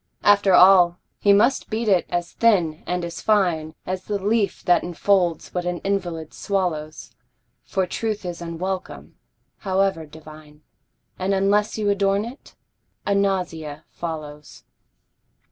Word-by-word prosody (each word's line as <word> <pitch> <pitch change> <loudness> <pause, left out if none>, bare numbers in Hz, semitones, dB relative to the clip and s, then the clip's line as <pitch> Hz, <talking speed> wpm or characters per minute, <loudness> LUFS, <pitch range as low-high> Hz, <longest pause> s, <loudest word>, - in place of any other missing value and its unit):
After 200 -2 +4
all 180 -1 +7 0.2
he 205 - +4
must 230 +7 +3
beat 225 +1 -2
it 190 -4 +3
as 175 -1 -2
thin 175 -9 +2
and 180 -1 -2
as 170 - -7
fine 170 -7 +1
As 185 0 -4
the 210 - -1
leaf 205 +1 0
that 175 - +3
enfolds 175 -1 0
what 180 - -2
an 175 0 -2
invalid 175 -5 -3
swallows, 165 -6 -3 0.5
For 190 - -1
truth 215 +2 -3
is 175 -1 -5
unwelcome, 180 +3 -5 0.4
however 190 -4 0
divine, 155 0 -14 0.6
And 190 +1 0
unless 205 +3 +1
you 215 -1 -1
adorn 200 +1 +1
it, 250 +5 -12 0.5
a 200 - +1
nausea 180 -7 -2
follows. 150 -3 -7
185 Hz, 130 wpm, -22 LUFS, 165-200 Hz, 0.6 s, all